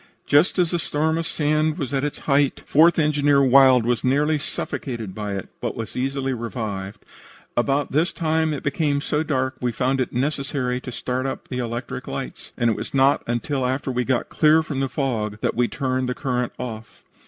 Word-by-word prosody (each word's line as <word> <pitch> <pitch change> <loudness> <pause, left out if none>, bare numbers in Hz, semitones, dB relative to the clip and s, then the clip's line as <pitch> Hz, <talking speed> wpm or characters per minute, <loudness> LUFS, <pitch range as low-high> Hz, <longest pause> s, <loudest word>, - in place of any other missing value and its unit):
"Just 145 +7 +3
as 175 -3 +2
the 175 - 0
storm 160 +1 0
of 165 - -2
sand 155 +1 +1
was 140 -6 -4
at 135 0 0
its 145 0 -2
height, 140 -1 +1
Fourth 165 +4 +5
Engineer 145 -3 +3
Wild 130 -2 +6
was 120 -1 0
nearly 150 +4 +2
suffocated 120 -7 -4
by 105 -1 -4
it, 95 - -6
but - - -2
was 115 -1 -6
easily 135 +1 -1
revived. 110 -5 -5 0.5
About 140 +4 +1
this 160 +6 +2
time 160 -2 0
it 145 - -4
became 145 0 0
so 150 +1 -1
dark 130 -4 0
that - - -13
we 125 - +1
found 130 +2 0
it 125 - -2
necessary 135 -1 -1
to 125 - -7
start 125 +2 -2
up 135 - -6
the 125 - -3
electric 120 0 -4
lights, - - -6
and 120 - +2
it - - -1
was - - -6
not 135 +1 +4
until 125 +3 -1
after 130 +1 -1
we 125 0 0
got 125 0 0
clear 155 +1 +4
from 145 -3 -4
the 135 -1 0
fog 115 -6 -2
that - - 0
we 120 +1 +2
turned 130 -1 -1
the 125 - -2
current 125 -3 -1
off. 115 -3 -7
135 Hz, 200 wpm, -23 LUFS, 125-150 Hz, 0.5 s, Wild